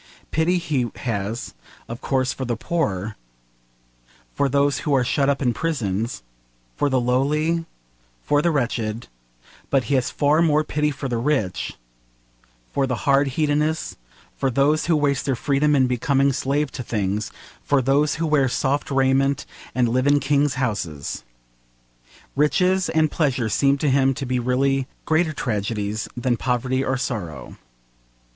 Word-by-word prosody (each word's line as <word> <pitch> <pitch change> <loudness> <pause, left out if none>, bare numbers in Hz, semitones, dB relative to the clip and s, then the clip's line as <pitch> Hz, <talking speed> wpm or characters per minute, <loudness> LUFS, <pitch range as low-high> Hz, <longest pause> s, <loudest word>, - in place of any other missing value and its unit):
Pity 165 +4 +2
he 145 -9 -1
has, 110 0 -3 0.3
of 120 +1 -7
course, 130 -1 0
for 135 - -5
the 120 -3 -2
poor, 110 - -2 1.2
for 140 - +1
those 140 +1 +2
who 145 - +1
are 130 - +3
shut 140 +3 +1
up 140 0 0
in 120 -2 +2
prisons, 115 - -2 0.5
for 145 - +1
the 130 -1 +2
lowly, 150 +7 +1 0.6
for 145 0 +2
the 170 - +2
wretched; 120 -6 -2 0.6
but 135 -2 +2
he 140 - -2
has 130 -3 +2
far 150 +2 +2
more 155 -2 +3
pity 150 0 0
for 140 -1 -4
the 120 -2 -1
rich, 120 -8 -1 1.0
for 135 -1 +1
the 125 -4 -3
hard 140 0 +4
hedonists, 150 +1 0 0.4
for 135 - 0
those 140 +5 +2
who 170 - +3
waste 140 -2 +1
their 135 - +1
freedom 145 +4 +2
in 130 -2 +4
becoming 135 +2 +2
slaves 140 +2 0
to - - -6
things, 105 -3 -2 0.3
for 140 - +2
those 140 +3 +2
who 165 - -1
wear 145 -4 +3
soft 135 +3 0
raiment 135 0 +2 0.3
and 125 -1 +3
live 130 +3 +1
in 145 0 +5
kings' 145 0 +1
houses. 100 - -3 1.1
Riches 180 +6 +2
and 155 -1 +2
pleasure 130 -7 0
seemed 140 +5 +2
to 150 - +2
him 135 0 +3
to 135 - -4
be 125 0 0
really 130 +2 +1 0.2
greater 160 +1 +2
tragedies 105 -4 -2
than 120 0 0
poverty 130 +2 0
or 130 -1 0
sorrow. 90 - -5
135 Hz, 150 wpm, -22 LUFS, 125-145 Hz, 1.2 s, in